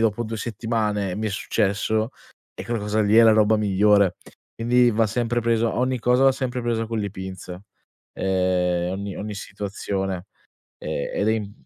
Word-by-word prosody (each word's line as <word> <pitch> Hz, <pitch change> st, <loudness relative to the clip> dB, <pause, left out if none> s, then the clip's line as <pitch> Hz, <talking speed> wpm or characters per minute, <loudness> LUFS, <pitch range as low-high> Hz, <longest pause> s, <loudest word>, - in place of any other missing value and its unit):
dopo 115 Hz, +1 st, +1 dB
2 115 Hz, 0 st, -5 dB
settimane, 110 Hz, -3 st, -2 dB
e -, -, -3 dB
mi 110 Hz, +1 st, -2 dB
è -, -, -5 dB
successo, 110 Hz, +2 st, 0 dB, 0.4 s
e -, -, -8 dB
quella 115 Hz, -2 st, -2 dB
cosa 105 Hz, +1 st, 0 dB
lì 105 Hz, 0 st, +2 dB
è 115 Hz, -, +9 dB
la 115 Hz, -, +7 dB
roba 110 Hz, 0 st, +4 dB
migliore. 100 Hz, -2 st, +3 dB, 0.4 s
Quindi 120 Hz, +1 st, +4 dB
va 110 Hz, 0 st, +2 dB
sempre 120 Hz, +2 st, -1 dB
preso 115 Hz, -1 st, +1 dB
ogni 130 Hz, +1 st, 0 dB
cosa 125 Hz, +3 st, +3 dB
va 135 Hz, -, +6 dB
sempre 125 Hz, -1 st, -3 dB
presa 115 Hz, -1 st, -1 dB
con 115 Hz, 0 st, -3 dB
le 105 Hz, -1 st, -2 dB
pinze, 95 Hz, -1 st, -8 dB, 0.5 s
ehm, 90 Hz, -2 st, 0 dB
ogni 100 Hz, 0 st, -5 dB
ogni 105 Hz, +1 st, -5 dB
situazione. 95 Hz, -2 st, -4 dB, 0.5 s
Ehm, 70 Hz, -, -3 dB
ed 105 Hz, -, 0 dB
è -, -, +4 dB
im 105 Hz, -2 st, -3 dB
105 Hz, 180 wpm, -23 LUFS, 100-115 Hz, 0.5 s, è